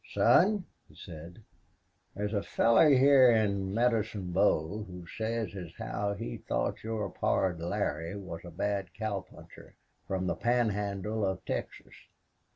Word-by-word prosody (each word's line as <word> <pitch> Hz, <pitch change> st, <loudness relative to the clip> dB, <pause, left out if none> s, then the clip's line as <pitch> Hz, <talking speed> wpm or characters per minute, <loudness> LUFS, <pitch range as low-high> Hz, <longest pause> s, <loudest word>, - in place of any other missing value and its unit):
"Son," 200 Hz, +2 st, +4 dB, 0.2 s
he -, -, -19 dB
said, 85 Hz, +6 st, -11 dB, 0.7 s
"there's 105 Hz, +2 st, -3 dB
a 100 Hz, -, +1 dB
feller 115 Hz, +9 st, +4 dB
hyar 135 Hz, -1 st, +7 dB
in 100 Hz, -4 st, +1 dB
Medicine 110 Hz, -4 st, 0 dB
Bow 95 Hz, +1 st, +1 dB
who 90 Hz, -3 st, -10 dB
says 110 Hz, +3 st, -3 dB
as 90 Hz, -3 st, -8 dB
how 100 Hz, 0 st, -2 dB
he -, -, -5 dB
thought -, -, -2 dB
your 110 Hz, -1 st, -2 dB
pard 90 Hz, -3 st, 0 dB
Larry 85 Hz, +1 st, -2 dB
was 95 Hz, -5 st, -7 dB
a 90 Hz, -, -9 dB
bad 95 Hz, +2 st, -3 dB
cowpuncher 105 Hz, -4 st, -7 dB, 0.3 s
from 95 Hz, -1 st, -2 dB
the -, -, 0 dB
Pan 120 Hz, +1 st, +2 dB
Handle 105 Hz, +1 st, -2 dB
of 95 Hz, -1 st, -2 dB
Texas." -, -, -5 dB
100 Hz, 140 wpm, -30 LUFS, 95-110 Hz, 0.7 s, hyar